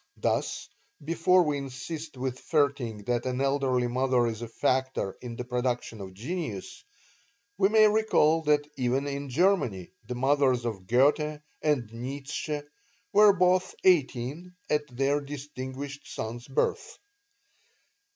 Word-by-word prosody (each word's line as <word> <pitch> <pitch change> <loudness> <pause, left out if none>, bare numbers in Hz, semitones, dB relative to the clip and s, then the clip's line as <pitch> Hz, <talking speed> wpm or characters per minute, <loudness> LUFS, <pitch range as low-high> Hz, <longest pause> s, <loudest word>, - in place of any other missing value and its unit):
Thus, - - -1 0.4
before 170 +3 +4
we 150 -3 -1
insist 140 +3 -7
with 130 0 -3
Vaerting 130 -9 0
that 120 0 0
an 125 0 -2
elderly 135 -2 +1
mother 125 0 +2
is 115 -1 -3
a 120 - -4
factor 130 -3 0
in 120 -2 -6
the 125 - -5
production 125 -3 -2
of 95 -1 -9
genius, 120 - -5 0.8
we 195 0 +5
may 215 0 +6
recall 210 -7 +3
that 145 0 +3
even 130 +2 0
in 140 0 -4
Germany 130 - +1 0.2
the 125 - -4
mothers 130 -1 +2
of 100 -6 -4
Goethe 150 +5 +2 0.2
and 130 -8 0
Nietzsche 140 +5 -4 0.5
were 210 0 +8
both 185 0 +2
eighteen 160 0 +1 0.2
at 150 0 +1
their 135 +3 0
distinguished 140 0 -7
son's 120 +2 -5
birth. 135 - -1
135 Hz, 130 wpm, -28 LUFS, 125-150 Hz, 0.8 s, were